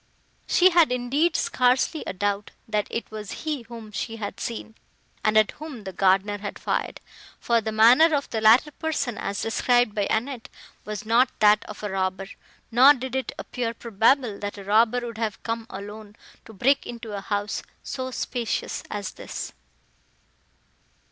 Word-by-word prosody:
She 370 +1 +5
had, 335 -5 +5
indeed, 275 +7 +1
scarcely 260 -1 +2
a - - -3
doubt, 205 +2 -1 0.2
that 210 -2 -1
it 230 - -4
was 210 -2 -7
he 300 -4 -1
whom 230 -2 -10
she 225 +2 -4
had 205 -2 -6
seen, 225 -1 -5 0.5
and 215 0 +3
at 215 -2 +4
whom 295 -8 -9
the 190 -1 -7
gardener 195 +2 +2
had 205 0 -6
fired: - - -2 0.4
for 235 -1 +2
the 220 0 -3
manner 245 +9 +6
of 280 - -1
the 220 - -1
latter 230 +7 +6
person, 290 -6 -2
as 200 0 -3
described 245 0 +2
by 205 -1 0
Annette, 240 +1 -2 0.4
was 210 +1 -5
not 235 +4 +4
that 210 0 +5
of 210 0 -10
a 210 - -3
robber; 190 0 -2 0.4
nor 260 +5 +7
did 260 0 -5
it 265 -3 -2
appear 235 -2 -4
probable, 230 +1 +1
that 205 0 -5
a 200 - -8
robber 225 +4 +3
would 230 -2 -6
have 220 -3 -3
come 230 0 -3
alone, 205 +2 -9 0.3
to - - -12
break 265 +7 +2
into 230 -3 -7
a 200 - -4
house 205 0 -2 0.2
so 260 -1 -4
spacious 245 -2 -3
as 205 -2 -4
this. - - -7
225 Hz, 170 wpm, -25 LUFS, 205-250 Hz, 0.5 s, nor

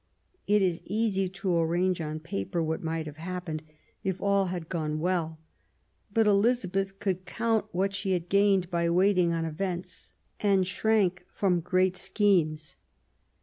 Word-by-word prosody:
It 205 -1 +4
is 175 -3 0
easy 200 -2 0
to 190 -2 -1
arrange 175 +2 +1
on 155 0 -4
paper 160 - -2
what 160 0 -2
might 160 -1 -2
have 150 0 -8
happened, 175 -2 -5 0.4
if 190 -2 -2
all 200 -1 +2
had 175 -3 -4
gone 155 -3 -2
well. 165 -2 -1 0.7
But 225 +2 +3
Elizabeth 200 -2 +1
could 185 -2 -2
count 225 +1 0
what 195 +2 0
she 195 -1 0
had 175 -1 -2
gained 195 -2 +3
by 170 -1 +1
waiting 180 0 +3
on 165 -1 -1
events, 175 +2 -5 0.2
and 195 -3 +3
shrunk 190 -1 +1
from 185 -3 +1
great 185 +2 +1
schemes. 180 -6 +1
185 Hz, 150 wpm, -28 LUFS, 170-195 Hz, 0.7 s, It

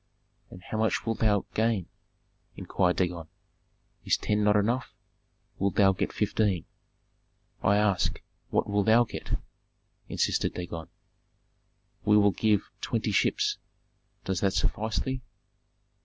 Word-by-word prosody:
"And 90 - -12
how 110 - -4
much 110 0 +1
wilt 115 -1 -1
thou 105 -3 +2
gain?" 110 -4 +1 0.7
inquired 90 -2 0
Dagon. 85 -3 -1 0.8
"Is - - +2
ten 105 0 0
not 105 0 +4
enough? 115 +5 0 0.6
Thou 100 - +2 0.2
wilt 95 - -6
get - - 0
fifteen." 100 -6 0 1.0
"I 100 - +3
ask, 105 -4 +1 0.3
what - - +1
wilt 100 +1 0
thou 115 +2 +6
get?" 120 - -4 0.7
insisted - - 0
Dagon. 85 -2 -5 1.2
"We 105 0 +5
will 100 -1 +5
give 105 +2 +1
twenty - - -1
ships. - - +1 0.7
Does 95 -2 -1
that 95 -1 +1
suffice 105 +3 -1
thee?" 130 -1 -2
105 Hz, 125 wpm, -28 LUFS, 95-110 Hz, 1.2 s, thou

